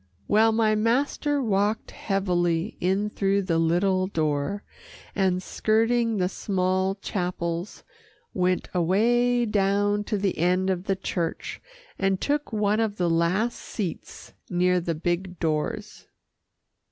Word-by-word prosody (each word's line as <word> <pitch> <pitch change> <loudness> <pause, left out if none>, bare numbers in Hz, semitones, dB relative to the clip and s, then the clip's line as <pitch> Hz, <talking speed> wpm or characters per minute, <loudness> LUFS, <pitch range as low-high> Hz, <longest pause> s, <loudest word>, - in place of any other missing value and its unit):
Well, 220 +2 +4
my 220 -1 +2
master 270 +6 +1
walked 205 0 0
heavily 180 -2 0
in 190 +3 +1
through 200 0 +1
the 170 -3 +1
little 185 +3 +2
door, 155 +3 -1 0.5
and 185 -2 +1
skirting 225 +2 +1
the 180 -1 +1
small 190 0 0
chapels, 180 -2 -3 0.5
went 185 -1 0
away 240 +7 +2
down 205 0 +1
to 210 - -1
the 195 -4 -1
end 180 +3 +2
of 180 0 -3
the 195 - +1
church 170 -3 -4 0.4
and 195 -1 +1
took 290 +1 -1
one 210 0 +1
of 215 -2 -1
the 175 -2 +1
last 180 +8 +1
seats 190 -7 -6 0.2
near 180 0 +2
the 170 -1 -2
big 175 +3 -2
doors. 155 -2 -2
195 Hz, 125 wpm, -25 LUFS, 180-215 Hz, 0.5 s, Well